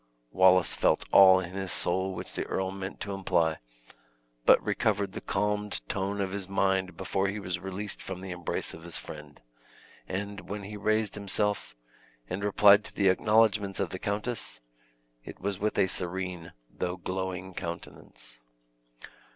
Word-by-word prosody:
Wallace 95 -1 +5
felt - - +2
all 95 -1 +8
in 90 -1 -5
his 95 -1 -4
soul 95 +2 -1
which - - -6
the - - -2
earl 95 0 -1
meant 95 0 -6
to 100 - -3
imply; 85 -4 +1 0.9
but - - +8
recovered 100 -2 0
the - - -7
calmed 105 0 -2
tone 100 +1 -2
of 95 -1 -2
his 100 -1 -4
mind 95 -1 +1
before 95 +1 0
he 100 +2 -3
was 90 -3 -3
released 95 +2 -4
from 95 -1 -6
the 95 -1 -6
embrace 90 -1 -2
of 80 - -10
his 85 0 -4
friend; 75 -1 -10 0.7
and 100 +1 -5
when 100 0 -4
he 105 +2 -7
raised 110 0 0
him 100 -1 -7
self, 105 -9 0 0.5
and 95 +7 -4
replied 105 0 +6
to - - -8
the 100 -2 +4
acknowledgments 105 0 +3
of 95 - -1
the 95 - -5
countess, 105 - -3 0.6
it - - -10
was 100 0 -3
with 105 +1 -1
a - - +5
serene, 90 -2 -2
though 90 +6 -4
glowing 95 +1 -4
countenance. 85 -8 -8
95 Hz, 160 wpm, -29 LUFS, 90-100 Hz, 0.9 s, all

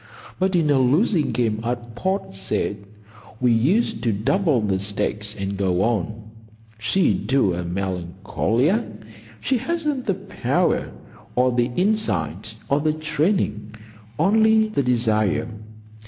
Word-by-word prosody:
But 190 0 +1
in 160 -4 +3
a 140 - +4
losing 150 - +2
game 110 -3 0
at 120 0 -4
Port 190 - -2
Said 100 +1 -3 0.5
we 125 -1 +3
used 185 - +2
to 115 - +1
double 140 - +1
the 100 -3 0
stakes 105 +1 -2
and 100 0 -3
go 95 -1 +1
on. 110 -1 -1 0.6
She 155 - +2
do 130 -9 +1
a 90 +1 -3
Melancolia! 95 - -1 0.6
She 260 -2 +1
hasn't 300 -2 -2
the 195 - +2
power, 195 +1 -1 0.4
or 125 +1 +3
the 120 0 +1
insight, 110 - 0
or 140 - +2
the 155 +1 +1
training. 150 - -1 0.4
Only 220 +1 +4
the 215 - 0
desire. 115 -3 +1
125 Hz, 125 wpm, -22 LUFS, -, 0.6 s, a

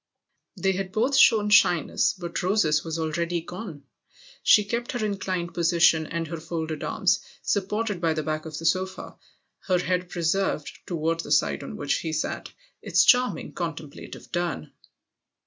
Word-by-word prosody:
They 195 - +1
had 190 0 -3
both 245 +7 +1
shown 215 -5 +5
shyness, 175 -7 +4
but 175 -2 -5
Rose's 175 -5 +2
was 165 -1 -4
already 170 +2 -1
gone. 170 -3 -8 0.6
She 210 - +6
kept 235 +4 -3
her 240 -3 -1
inclined 185 -4 -3
position 170 -2 +3
and 170 -1 -3
her 165 +1 -6
folded 160 -2 -4
arms; - - +1 0.2
supported 205 -1 -1
by 165 -2 +1
the 155 - -2
back 155 +1 -3
of 155 -1 -6
the 165 - -6
sofa, 190 +2 -1 0.5
icr 180 -2 +2
head 180 0 -1
preserved, 170 -2 -1
toward 165 -1 -1
the - - -5
side - - +2
on 70 - -7
which 140 - 0
he 160 -1 -3
>at, - - -6 0.3
its - - +3
charming 250 0 +3
contemplative 160 -4 -7
turn. 170 - -3
175 Hz, 155 wpm, -25 LUFS, 160-195 Hz, 0.6 s, She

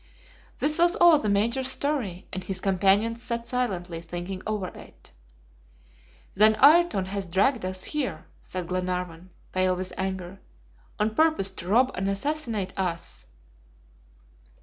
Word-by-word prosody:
This 305 +2 0
was 345 +1 +4
all 340 -3 +6
the 215 - -1
Major's 235 +6 +2
story, 260 -10 -2
and 185 0 -4
his 190 -1 -3
companions 200 +5 +2
sat 235 -1 -3
silently 185 -9 -2
thinking 175 +3 -6
over 210 -4 -2
it. - - -14 1.2
"Then 215 +2 +6
Ayrton 300 - +5
has 195 0 -4
dragged 200 +8 +1
us 185 0 -4
here," 295 -4 -3
said 185 -1 -5
Glenarvan, 180 -1 -4 0.2
pale 185 0 +1
with 185 0 -5
anger, 190 0 -4 0.6
"on 215 +1 0
purpose 310 -9 +2
to 180 -2 -8
rob 250 +6 +3
and 195 +1 -2
assassinate 230 -2 -2
us." 175 -3 -3
195 Hz, 130 wpm, -26 LUFS, 185-250 Hz, 1.2 s, all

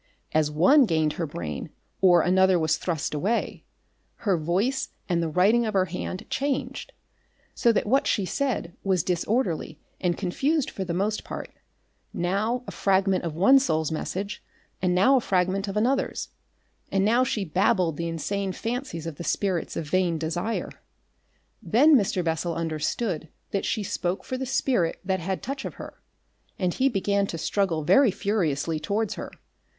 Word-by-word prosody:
As 155 -1 +2
one 225 - +5
gained 155 -3 +1
her 165 - -3
brain 75 - -5 0.3
or 175 -3 +6
another 190 0 +4
was 160 -2 +1
thrust 165 -5 -2
away, 195 +11 -1 0.6
her 195 -3 +3
voice 185 - 0 0.2
and 175 -2 +1
the 165 - -1
writing 200 +9 +3
of 215 -2 -2
her 185 -1 +4
hand 185 +1 -5
changed. 275 -1 -2 0.6
So 235 - +3
that 225 - 0
what 265 +6 +2
she 200 - +1
said 245 -7 -2
was 185 -4 +1
disorderly 180 - -1 0.2
and 175 -2 0
confused 270 - 0
for 195 - -4
the 170 -2 -3
most 210 +4 -1
part; - - -7 0.6
now 210 +8 0
a - - -6
fragment 190 -1 +1
of 160 -2 -4
one 230 +11 +6
soul's 160 - 0
message, 195 +5 -4 0.4
and 180 -1 +2
now 235 +9 +5
a - - +1
fragment 190 0 0
of 195 +1 -3
another's, 255 +5 0 0.6
and 195 0 +2
now 235 +4 +4
she 215 -5 -1
babbled 180 -1 +1
the 170 - -2
insane 190 +4 -2
fancies 230 - -4
of 165 -3 -6
the - - -6
spirits 185 -1 -1
of 160 - -3
vain 175 +1 +1
desire. 170 +8 -2 0.9
Then 250 - +5
Mr. 195 -6 +2
Bessel 165 +1 -1
understood 160 +2 -2 0.2
that 195 - -1
she 215 - -1
spoke 185 0 -2
for 255 - -4
the 260 0 -3
spirit 245 -9 +1
that 190 0 0
had 185 +2 -3
touch 275 +2 -4
of - - -6
her, - - -10 0.6
and 180 -3 0
he 270 +1 +2
began 200 -2 0
to 165 - -5
struggle 165 -2 0
very 270 - +5
furiously 170 -7 -1
towards 200 +7 -1
her. - - -6
190 Hz, 165 wpm, -26 LUFS, 170-220 Hz, 0.9 s, or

